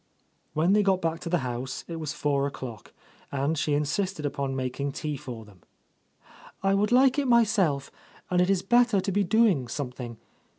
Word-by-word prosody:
When 165 +5 +3
they 210 - +5
got 195 -2 +2
back 165 -1 -1
to 170 - -6
the 175 - +2
house 125 +1 -4
it 165 - -5
was 155 -2 -4
four 140 -1 0
o'clock, 120 -6 -8 0.4
and 140 +3 0
she 145 -1 0
insisted 155 +3 -1
upon 140 -1 -2
making 135 +2 -3
tea 150 0 -3
for 120 -4 -8
them. 100 -5 -18 1.0
"I 195 0 +3
would 205 +3 +1
like 260 +2 +5
it 280 - 0
myself, 210 - +2 0.4
and 180 0 +3
it 180 - +2
is 195 -2 +2
better 240 -4 +4
to 195 +1 -2
be 200 +2 +2
doing 195 - +3
something. 125 -2 -5
155 Hz, 180 wpm, -27 LUFS, 135-195 Hz, 1.0 s, they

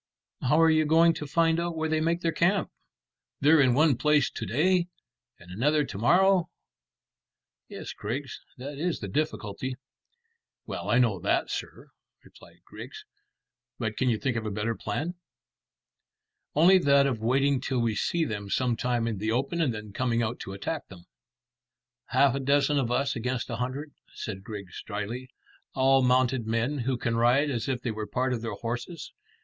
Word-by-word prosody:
"How 150 +5 +3
are 165 0 +6
you 155 0 +3
going 165 +2 +5
to 150 - -6
find 165 +2 +2
out 170 -1 -2
where 160 0 0
they 155 0 0
make 170 +2 0
their 165 - +1
camp? 185 +4 +1 0.7
They're 150 +2 +5
in 125 -3 +4
one 150 -1 +4
place 150 -2 +3
to - - -5
day 175 - +2 0.5
and 90 0 -15
another 145 +9 +1
to 100 - -7
morrow." 180 - +4 1.2
"Yes, - - -7
Griggs, 130 +6 -5 0.2
that 140 +3 -7
is 175 +1 -1
the 100 - -5
difficulty." 130 0 -3 0.9
"Well, - - -5
I 120 - +4
know 115 -7 +2
that, - - 0
sir," - - -6 0.3
replied - - -18
Griggs; - - -10 0.7
"but 110 -1 -3
can 130 - +1
you 115 - +1
think 130 +1 -1
of 115 - -2
a 110 - -3
better 105 +3 -2
plan?" 145 +11 -3 1.4
"Only 180 +5 +6
that 140 -3 +4
of 130 -5 -1
waiting 135 +4 +2
till 135 -1 -2
we 115 -2 +1
see 165 +10 0
them 100 -5 -5
some 125 +2 +1
time 120 -1 -1
in 110 -4 -3
the 110 +2 -1
open, 140 +8 -1
and 150 -6 +2
then 105 -2 -8
coming 120 0 0
out 115 +2 -3
to 95 - -7
attack 125 +11 -4
them." 90 -3 -14 1.0
"Half 140 -2 +3
a 135 - -2
dozen 140 +2 +2
of 125 -4 -1
us 140 +3 0
against 125 +1 -3
a 115 - -3
hundred," 130 +4 -4 0.2
said 95 -3 -6
Griggs 100 -3 -8
dryly; 110 +5 -5 0.5
"all 135 0 +4
mounted 125 -2 +2
men 120 +6 0
who 125 +1 -1
can 115 -1 -1
ride 125 +5 +3
as 120 -1 -2
if 125 -2 -2
they 120 - -1
were 110 -1 -5
part 130 +1 -1
of 115 - -3
their 115 - -4
horses. 120 +8 -5
130 Hz, 180 wpm, -27 LUFS, 115-150 Hz, 1.4 s, are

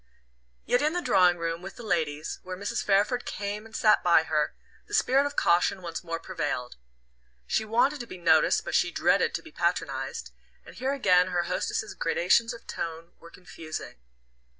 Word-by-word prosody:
Yet 245 - +2
in 305 +2 +1
the 355 - -1
drawing 180 -1 +4
room, 165 0 -3
with 195 +1 -9
the 240 - -10
ladies, 155 -6 -2
where 185 0 -7
Mrs. 200 +2 -3
Fairford 205 +5 +2
came 205 +2 -5
and 225 - -14
sat 215 - +4
by 170 -2 +5
her, 155 -2 -1 0.3
the - - -2
spirit 275 +2 +3
of 285 - -8
caution 180 +2 +2
once 170 0 -5
more 165 -1 -4
prevailed. 145 -7 -4 0.7
She 220 - 0
wanted 245 +7 +2
to 240 - -7
be 185 - -9
noticed 160 -3 +3
but - - -5
she - - +3
dreaded - - +2
to - - -4
be - - -13
patronized, - - -2 0.3
and - - -12
here 260 +2 -2
again 180 -8 +4
her 175 -1 0
hostess's - - -2
gradations 480 - +2
of 235 - -10
tone 165 +1 -6
were 170 - -13
confusing. 165 -3 -8
185 Hz, 180 wpm, -27 LUFS, 165-230 Hz, 0.7 s, by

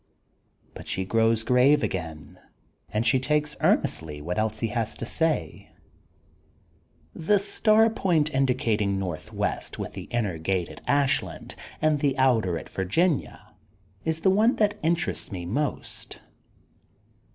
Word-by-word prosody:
But - - -11
she 95 - -2
grows 115 +2 +2
grave 130 +5 +4
again 80 -5 -5 0.5
and 110 +2 -1
she 130 - +4
takes 150 +3 0
earn - - +4
estly 75 -2 -5
what 85 +6 -3
else 110 0 -1
he 115 - 0
has 110 -1 -2
to - - -5
say: 150 - -1 1.5
^*The 185 +6 +2
star 215 +2 +3
point 160 -8 +1
indicating 115 -7 +1
northwest 90 -5 -3
with 105 - -5
the 95 -3 -7
inner 105 -9 -2
gate 90 +1 -1
at - - -11
Ashland 145 0 0 0.3
and 155 -1 +3
the 140 -1 0
outer 115 -10 +2
at - - -8
Virginia 145 - -1 0.5
is 160 0 -2
the 190 - +4
one 220 +6 +3
that 210 -1 +1
interests 165 -5 0
me 90 -3 -5
most. 140 +11 -4
125 Hz, 135 wpm, -26 LUFS, 95-155 Hz, 1.5 s, grave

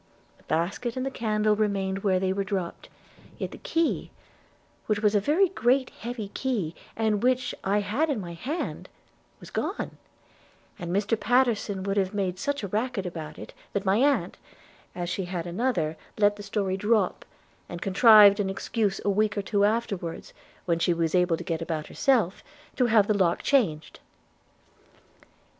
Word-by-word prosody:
The - - -24
basket 195 +9 -2
and 255 - -1
the 270 - -2
candle 215 -3 +1
remained 195 -2 0
where 190 -2 +1
they 190 0 0
were 200 +1 -1
dropped; 190 -3 -4 0.5
yet - - -4
the - - -10
key, 335 -10 -1 0.8
which 215 -1 +1
was 210 -1 +2
a 205 - +4
very 320 - +3
great 260 -5 +1
heavy 230 -3 -6
key, 210 -9 -2 0.2
and 220 -2 +1
which 250 +1 +1
I 205 +2 +1
had 250 +11 0
in 275 -6 0
my 175 -3 -6
hand, 280 - -4 0.5
was - - -12
gone; - - -3 0.8
and 175 -2 -5
Mr 205 +4 +1
Pattenson 220 -3 +1
would 195 +1 -1
have 195 +1 0
made 185 -2 -1
such 285 -3 -2
a - - -2
racket 215 0 -2
about 160 -3 -6
it, - - -10 0.2
that 200 0 -2
my 195 +2 +3
aunt, 280 +3 +2 0.6
as 175 -1 -3
she 185 +1 -2
had 175 -2 -4
another, 175 -4 -1 0.2
let 205 -1 +4
the 205 - -9
story 195 -2 -2
drop, 210 -1 +1 0.5
and 175 - -6
contrived 205 +1 +7
an 195 -2 0
excuse 200 +1 -1
a - - +3
week 210 +1 +1
or 200 - -1
two 205 -1 +2
afterwards, 205 -6 -2 0.3
when 170 -2 +1
she 170 0 +2
was 165 -1 0
able 180 -2 +3
to 175 - -7
get 165 -1 -3
about 160 -2 -3
herself, 230 -9 +1 0.3
to 250 - +2
have 220 -3 +5
the 215 - +2
lock 185 -4 +1
changed.' 170 - +1
205 Hz, 170 wpm, -26 LUFS, 185-230 Hz, 0.8 s, contrived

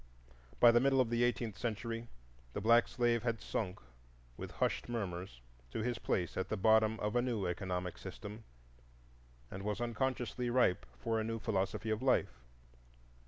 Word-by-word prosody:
By 120 - +9
the 120 - +5
middle 135 +1 +3
of 120 -3 +2
the 120 0 +2
eighteenth 120 -3 0
century 115 0 -3 0.5
the - - -2
black 115 +3 +5
slave 120 -2 +1
had 115 -2 -1
sunk, 95 -4 -3 0.6
with - - -6
hushed - - -1
murmurs, 90 - -4 0.3
to 110 - -3
his 120 0 -1
place 90 -2 -1
at 95 0 -1
the 110 - -1
bottom 110 +2 +4
of 105 +2 -1
a 120 - +4
new 120 -6 -1
economic 90 0 -3
system, 105 +2 -8 1.1
and 95 - -6
was 105 +1 -2
unconsciously 120 0 -1
ripe 120 -7 +2
for 110 - 0
a - - 0
new 115 +1 -2
philosophy 110 0 -1
of 110 +2 -1
life. 130 - +2
110 Hz, 165 wpm, -35 LUFS, 100-120 Hz, 1.1 s, By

